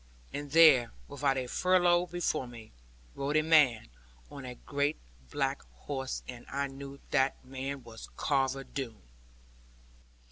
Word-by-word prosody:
And 145 Hz, 0 st, -5 dB
there, 140 Hz, -6 st, +6 dB, 0.2 s
about 140 Hz, -1 st, +1 dB
a 130 Hz, -, -1 dB
furlong 180 Hz, +3 st, +3 dB
before 170 Hz, -6 st, -1 dB
me, 115 Hz, -2 st, -12 dB, 0.4 s
rode 145 Hz, +2 st, 0 dB
a 155 Hz, -, +3 dB
man 145 Hz, -, +4 dB, 0.4 s
on 140 Hz, -2 st, -8 dB
a 125 Hz, -1 st, -7 dB
great 145 Hz, +4 st, -1 dB, 0.3 s
black 135 Hz, -1 st, -1 dB, 0.2 s
horse, 135 Hz, -2 st, -4 dB
and 125 Hz, -2 st, -8 dB
I 140 Hz, +1 st, -1 dB
knew 140 Hz, 0 st, -8 dB
that 135 Hz, -1 st, +3 dB
the 130 Hz, -, -19 dB
man 135 Hz, 0 st, -4 dB
was 115 Hz, -1 st, -11 dB
Carver 135 Hz, -2 st, +1 dB
Doone. 120 Hz, -, -6 dB
140 Hz, 140 wpm, -31 LUFS, 130-145 Hz, 0.4 s, there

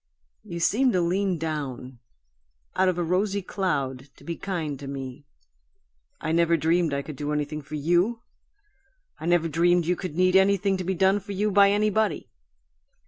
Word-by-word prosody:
You 170 Hz, -, -6 dB
seemed 240 Hz, +8 st, +2 dB
to 180 Hz, -, +2 dB
lean 185 Hz, +1 st, 0 dB
down 140 Hz, -6 st, -5 dB, 0.8 s
out 190 Hz, 0 st, +3 dB
of 180 Hz, -, -1 dB
a 175 Hz, -, 0 dB
rosy 195 Hz, +3 st, 0 dB
cloud 140 Hz, -9 st, -2 dB
to -, -, -18 dB
be 170 Hz, -, -4 dB
kind 160 Hz, -8 st, -4 dB
to 140 Hz, -, -8 dB
me. 135 Hz, -2 st, -7 dB, 0.9 s
I 155 Hz, -, -3 dB
never 170 Hz, 0 st, +3 dB
dreamed 165 Hz, +1 st, +1 dB
I 140 Hz, 0 st, -2 dB
could 155 Hz, -, -8 dB
do 145 Hz, +2 st, -4 dB
anything 150 Hz, +1 st, -2 dB
for 150 Hz, +2 st, -8 dB
YOU! 175 Hz, +10 st, +1 dB, 1.0 s
I 160 Hz, -, -5 dB
never 175 Hz, -1 st, +3 dB
dreamed 170 Hz, +2 st, +2 dB
you 180 Hz, +2 st, +1 dB
could 180 Hz, -4 st, -6 dB
need 185 Hz, +1 st, +3 dB
anything 195 Hz, 0 st, +3 dB
to 185 Hz, -, -4 dB
be 190 Hz, +2 st, -1 dB
done 190 Hz, +3 st, +3 dB
for 200 Hz, +1 st, -8 dB
you 205 Hz, +2 st, 0 dB
by 200 Hz, 0 st, +6 dB
anybody. 210 Hz, -3 st, 0 dB
175 Hz, 175 wpm, -25 LUFS, 150-195 Hz, 1.0 s, by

